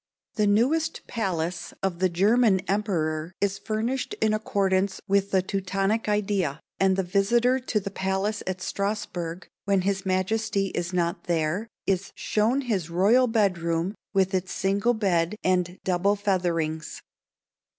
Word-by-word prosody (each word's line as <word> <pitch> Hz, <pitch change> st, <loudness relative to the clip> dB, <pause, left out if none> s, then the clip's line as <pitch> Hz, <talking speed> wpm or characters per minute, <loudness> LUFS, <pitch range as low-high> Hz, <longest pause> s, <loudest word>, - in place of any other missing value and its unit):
The 210 Hz, -2 st, +1 dB
newest 290 Hz, +11 st, +1 dB
palace 180 Hz, -6 st, -3 dB
of 185 Hz, -3 st, -1 dB
the 185 Hz, 0 st, +3 dB
German 200 Hz, +3 st, +3 dB
emperor 170 Hz, -5 st, -1 dB
is 200 Hz, 0 st, 0 dB
furnished 230 Hz, +6 st, -2 dB
in 215 Hz, -1 st, +2 dB
accordance 195 Hz, -2 st, 0 dB
with 200 Hz, 0 st, +2 dB
the 190 Hz, -2 st, +2 dB
Teutonic 195 Hz, +3 st, -1 dB
idea, 195 Hz, -8 st, 0 dB, 0.2 s
and 190 Hz, 0 st, +4 dB
the 190 Hz, -, 0 dB
visitor 235 Hz, +8 st, +2 dB
to 245 Hz, -4 st, -1 dB
the 200 Hz, 0 st, -6 dB
palace 190 Hz, +2 st, -1 dB
at 185 Hz, 0 st, -3 dB
Strasburg, 185 Hz, -4 st, -3 dB, 0.2 s
when 200 Hz, -2 st, +2 dB
his 195 Hz, +1 st, -1 dB
majesty 195 Hz, +1 st, 0 dB
is 175 Hz, 0 st, -3 dB
not 170 Hz, -1 st, -1 dB
there, 170 Hz, +5 st, 0 dB, 0.2 s
is 195 Hz, 0 st, -1 dB
shown 225 Hz, +6 st, +1 dB
his 200 Hz, -, -2 dB
royal 210 Hz, +9 st, +4 dB
bed 205 Hz, -6 st, +2 dB
room 170 Hz, +3 st, -1 dB, 0.2 s
with 190 Hz, -1 st, +2 dB
its 185 Hz, 0 st, -1 dB
single 200 Hz, +5 st, +1 dB
bed 185 Hz, -3 st, +1 dB
and 180 Hz, 0 st, +1 dB
double 190 Hz, +2 st, +2 dB
featherings. 170 Hz, -6 st, -1 dB
195 Hz, 140 wpm, -26 LUFS, 180-210 Hz, 0.2 s, and